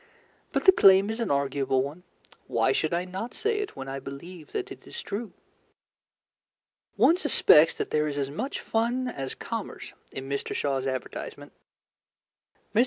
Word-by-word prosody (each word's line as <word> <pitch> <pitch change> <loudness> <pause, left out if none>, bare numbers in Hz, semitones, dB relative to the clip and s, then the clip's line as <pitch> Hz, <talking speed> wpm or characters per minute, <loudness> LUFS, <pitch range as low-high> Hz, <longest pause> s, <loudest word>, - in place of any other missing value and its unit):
But - - -1
the 380 - +10
claim 195 - +6
is 225 - -4
an 230 - -1
arguable 135 -1 +1
one. 145 +6 -7 0.5
Why 130 - +2
should 155 +3 0
I 175 +1 0
not 190 +6 -6
say 435 0 0
it 415 - -4
when 135 - -7
I 135 0 -4
believe 150 +5 -9
that 395 -1 -4
it - - -11
is - - -8
true? 225 - -5 1.6
One 340 - +5
suspects 165 - +5
that - - -4
there 150 0 +2
is 145 -1 -3
as 140 -1 -1
much 235 - -3
fun 240 +3 0
as 135 - -4
commerce - - -6 0.2
in 135 0 -7
Mr. 140 0 -3
Shaw's 135 -2 -1
advertisement. 130 -2 -5 1.2
Mr. 215 - +3
165 Hz, 165 wpm, -27 LUFS, 140-230 Hz, 1.6 s, the